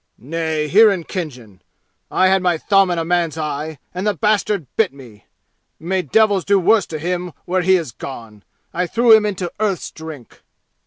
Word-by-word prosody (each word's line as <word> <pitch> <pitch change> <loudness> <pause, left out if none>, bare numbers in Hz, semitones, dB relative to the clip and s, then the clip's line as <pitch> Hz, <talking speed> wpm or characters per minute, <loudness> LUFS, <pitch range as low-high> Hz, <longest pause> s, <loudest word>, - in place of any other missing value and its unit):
"Nay. 155 +3 -3
Here 215 +8 +6
in 185 -4 -3
Khinjan. 125 - -7 0.5
I 185 - +3
had 190 0 +3
my 180 -2 +1
thumb 195 +2 +3
in 175 - -1
a 165 - -1
man's 170 -2 0
eye, 155 0 -4 0.2
and 185 +4 -3
the 210 - +1
bastard 205 -1 0
bit 220 -4 +2
me! 125 -7 -15 0.5
May 185 +3 -1
devils 200 - +2
do 200 0 +3
worse 200 +1 +3
to 155 - -5
him 175 +2 -3
where 185 +1 0
he 190 +2 +4
has 165 -8 -2
gone! 115 -4 -9 0.3
I 180 +1 -1
threw 230 +3 +5
him 215 -1 +2
into 185 -4 -4
Earth's 200 -5 -1
Drink!" 160 -6 -11
175 Hz, 180 wpm, -19 LUFS, 155-195 Hz, 0.5 s, Here